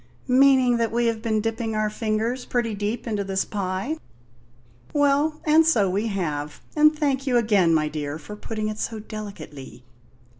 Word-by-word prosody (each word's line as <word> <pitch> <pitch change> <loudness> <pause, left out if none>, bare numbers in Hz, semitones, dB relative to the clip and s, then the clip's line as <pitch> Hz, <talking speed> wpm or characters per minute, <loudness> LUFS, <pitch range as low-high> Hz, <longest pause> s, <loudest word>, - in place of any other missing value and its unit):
"Meaning 260 -1 +5
that 230 -1 0
we 235 +1 +1
have 230 -1 0
been 220 -2 0
dipping 225 0 -2
our 215 0 0
fingers 225 +3 -1
pretty 240 -3 -1
deep 210 +3 -3
into 210 -4 -1
this 195 -1 -1
pie. 200 +8 -3 1.0
Well, 290 +2 +2
and 310 +1 +6
so 235 -12 +3
we 205 +4 0
have; 150 -8 -3 0.2
and 305 0 +5
thank 275 -2 0
you 250 -2 +3
again, 205 -7 +3
my 155 -2 +2
dear, 150 -1 -4
for 160 +7 -9
putting 215 0 -4
it 215 0 -4
so 225 - -3
delicately." 195 - -9
220 Hz, 165 wpm, -24 LUFS, 195-250 Hz, 1.0 s, and